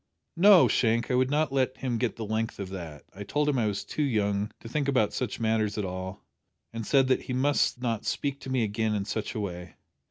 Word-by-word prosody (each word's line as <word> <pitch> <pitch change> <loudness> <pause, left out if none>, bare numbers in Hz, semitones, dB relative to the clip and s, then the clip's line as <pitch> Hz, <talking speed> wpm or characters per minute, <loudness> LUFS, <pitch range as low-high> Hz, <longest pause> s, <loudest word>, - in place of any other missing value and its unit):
"No, 190 0 +7
Shank, 115 0 +1
I - - +1
would 130 +1 +2
not 150 0 +1
let 130 -1 +1
him 125 -4 -2
get 120 -4 -1
the 115 - -5
length 110 +2 -2
of 100 -2 -5
that. 85 -7 -8
I 100 - -7
told 150 +8 0
him 140 -4 +2
I 110 - +1
was 100 -1 -2
too - - -3
young 105 -6 +1
to - - -26
to - - -9
think 140 +4 -1
about 125 -7 +2
such 125 -5 -3
matters 110 -2 0
at 105 - -1
all, 95 +1 -6 0.5
and 115 -2 -5
said 135 -2 +4
that 130 - +3
he 125 - -5
must 135 0 +1
not 115 -4 -2
speak 140 -1 -2
to - - -8
me 130 -2 +1
again 110 0 -1
in 100 -1 -2
such 110 +3 -4
a - - -2
way. 90 -4 -6
115 Hz, 245 wpm, -28 LUFS, 105-130 Hz, 0.5 s, No